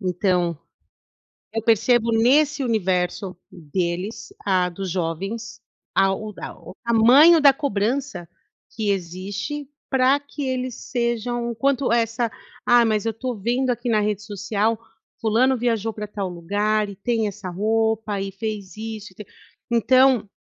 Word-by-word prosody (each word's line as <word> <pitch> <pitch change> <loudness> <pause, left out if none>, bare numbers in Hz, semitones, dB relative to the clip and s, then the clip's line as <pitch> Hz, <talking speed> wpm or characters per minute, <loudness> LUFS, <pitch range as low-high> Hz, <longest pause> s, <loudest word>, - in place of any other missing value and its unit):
então, 180 -3 0 1.0
eu 225 - -1
percebo 230 +1 +3
nesse 275 +5 +3
universo 185 -4 -1
deles, 180 +6 -4
ah, 185 -2 +2
dos 190 +2 -5
jovens, 195 +7 -4 0.3
a 195 0 +3
o 215 +1 -7
a - - -6
o - - -12
tamanho 255 +9 +7
da 285 -1 +8
cobrança 250 - -2 0.4
que 220 -3 -3
existe 200 - -4 0.2
pra 265 +1 +4
que 285 +1 -9
eles 255 -1 -2
sejam 240 -1 -2
o 235 - -6
quanto 270 -1 +1
essa: 230 0 +1 0.3
"Ah, 240 -1 +5
mas 215 -1 0
eu 225 - 0
tô 250 +2 -4
vendo 240 +5 0
aqui 240 0 -1
na 215 -2 +3
rede 210 -1 -1
social, 215 +1 -1 0.4
fulano 245 +4 +2
viajou 225 -2 0
para 210 0 -6
tal 200 -2 -4
lugar, 205 +5 0
e 200 - -8
tem 220 +2 0
essa 200 -2 -6
roupa, 220 +1 0
e 195 0 -4
fez 205 -1 -5
isso 215 -2 -6
e - - -22
t" 210 - -9 0.4
então, 250 -1 +4
220 Hz, 145 wpm, -23 LUFS, 195-240 Hz, 1.0 s, da